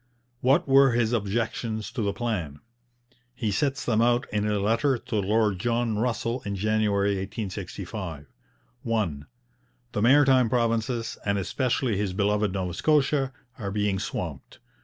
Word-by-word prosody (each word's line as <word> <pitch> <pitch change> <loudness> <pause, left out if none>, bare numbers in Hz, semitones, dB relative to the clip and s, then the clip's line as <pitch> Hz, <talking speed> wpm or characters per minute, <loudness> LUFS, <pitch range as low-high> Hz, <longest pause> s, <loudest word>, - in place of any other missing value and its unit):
What 135 +8 +3
were 135 -1 +6
his 120 -1 +1
objections 110 0 -2
to 120 - -3
the 100 -1 +1
plan? 100 -10 -3 0.8
He 115 -4 -1
sets 135 +6 -1
them 110 -2 +2
out 120 +1 +3
in 105 0 0
a 105 -1 +1
letter 115 +7 +2
to 120 0 -6
Lord 105 -1 +1
John 115 +1 0
Russell 120 +1 -1
in 100 -1 -3
January 105 0 +1
1865. 95 -4 -5 0.6
1. 100 -11 -1 0.7
The 105 - -2
Maritime 130 0 +5
Provinces, 115 -1 0
and 100 0 0
especially 120 +2 0
his 100 -2 -1
beloved 105 +1 +1
Nova 90 -2 -3
Scotia, 140 - +2 0.3
are 100 -3 -3
being 100 -1 0
swamped. - - -5
110 Hz, 140 wpm, -26 LUFS, 100-120 Hz, 0.8 s, were